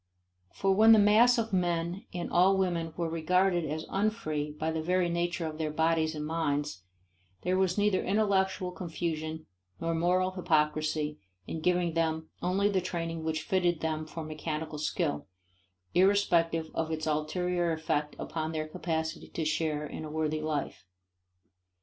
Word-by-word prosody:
For 195 - +1
when 220 +3 +7
the - - +7
mass 220 +4 +6
of 225 -2 -1
men 175 +2 0
and 175 -1 -4
all 190 +2 +5
women 170 -4 0
were 170 -1 0
regarded 175 +2 +2
as 155 +2 -3
unfree 195 -8 -1
by 155 +2 -2
the 160 0 -2
very 180 +2 +1
nature 170 0 -1
of 155 0 -5
their 155 -1 -1
bodies 160 0 +1
and 150 0 -4
minds, 150 - -1 0.6
there 180 +1 +1
was 185 0 +1
neither 205 -2 +2
intellectual 190 -2 +1
confusion 160 -3 -4 0.3
nor 165 0 -1
moral 180 +3 +2
hypocrisy 155 -3 0 0.3
in 160 - -5
giving 175 0 +1
them 160 -1 -1
only 190 +3 +2
the 195 -2 +1
training 165 -2 -3
which 160 -1 -2
fitted 175 -2 +1
them 155 -1 -2
for 165 0 -6
mechanical 155 0 -4
skill, 150 - -1 0.7
irrespective 170 -4 +3
of 160 -1 -1
its 155 0 -2
ulterior 175 +3 0
effect 150 -2 -1
upon 160 0 -3
their 155 -1 -2
capacity 160 -1 -3
to 160 - -4
share 155 -1 0
in 150 - -7
a 155 - -6
worthy 155 0 -1
life. 150 - -3
165 Hz, 155 wpm, -30 LUFS, 155-180 Hz, 0.7 s, when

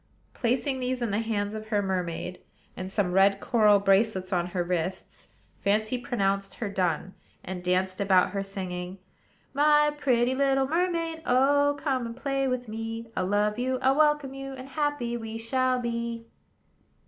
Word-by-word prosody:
Placing 260 +3 0
these 255 0 -1
in 230 - -1
the 205 - +1
hands 210 -2 -2
of 215 0 -6
her 205 -2 +1
mermaid, 180 -2 -3 0.4
and 185 0 -5
some 195 -2 0
red 195 +1 +4
coral 210 -2 +4
bracelets 195 -1 +2
on 175 -1 +1
her 180 0 -2
wrists, 180 +1 -4 0.3
Fancy 215 +4 +1
pronounced 200 -6 -1
her 215 - -4
done; 185 -1 -1 0.3
and 180 -1 -6
danced 185 +1 0
about 190 -2 +4
her, 200 - -2
singing: 185 -2 -5 0.6
"My 295 +1 +4
pretty 255 -4 +2
little 270 0 +2
mermaid, 330 0 -1
Oh! 285 +3 +3
come, 265 -4 -1
and 230 +1 -8
play 275 0 -1
with 255 -1 -2
me: 225 +1 -5
I'll 185 - 0
love 210 +2 +1
you, 255 +1 0
I'll 265 +1 +4
welcome 295 -2 +2
you; 270 0 -7
And 260 0 -9
happy 290 -5 -1
we 225 -1 -6
shall 255 +3 +1
be." 235 -1 -3
225 Hz, 160 wpm, -27 LUFS, 195-265 Hz, 0.6 s, red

